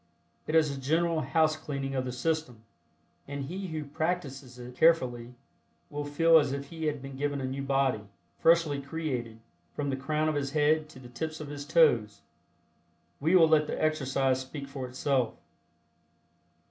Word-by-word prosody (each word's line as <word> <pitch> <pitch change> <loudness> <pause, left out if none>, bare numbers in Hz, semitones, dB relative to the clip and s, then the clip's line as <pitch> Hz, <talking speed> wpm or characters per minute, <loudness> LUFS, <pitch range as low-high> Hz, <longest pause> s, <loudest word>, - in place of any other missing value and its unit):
It 155 - -1
is 155 -3 +3
a 135 - -8
general 165 +3 +1
housecleaning 145 -1 0
of 130 -1 -1
the 125 - -3
system, 130 -3 -2 0.6
and 140 0 -4
he 190 +6 -5
who 160 -3 -4
practices 140 -4 -3
it 125 0 -9
carefully 125 -7 +2 0.6
will 145 0 -4
feel 165 +3 +5
as 145 -3 0
if 140 0 -5
he 160 -1 -5
had 150 -3 -2
been 135 0 -8
given 145 +1 -2
a 130 - -3
new 135 +1 -3
body, 135 -6 0 0.3
freshly 165 -4 +3
created, 135 -7 -4 0.4
from 145 -1 -2
the - - 0
crown 150 +3 -1
of 155 - +1
his 140 -1 -2
head 155 0 +2
to 155 - -14
the 130 -1 -11
tips 155 +6 -5
of 150 -2 -7
his 145 -1 -6
toes. 120 -11 +3 1.0
We 160 +6 +3
will 165 -3 +7
let 155 -1 +4
the - - -3
exercise 135 -4 +1
speak 140 +2 -7
for 135 -2 -6
itself. 130 -1 0
140 Hz, 170 wpm, -29 LUFS, 130-155 Hz, 1.0 s, will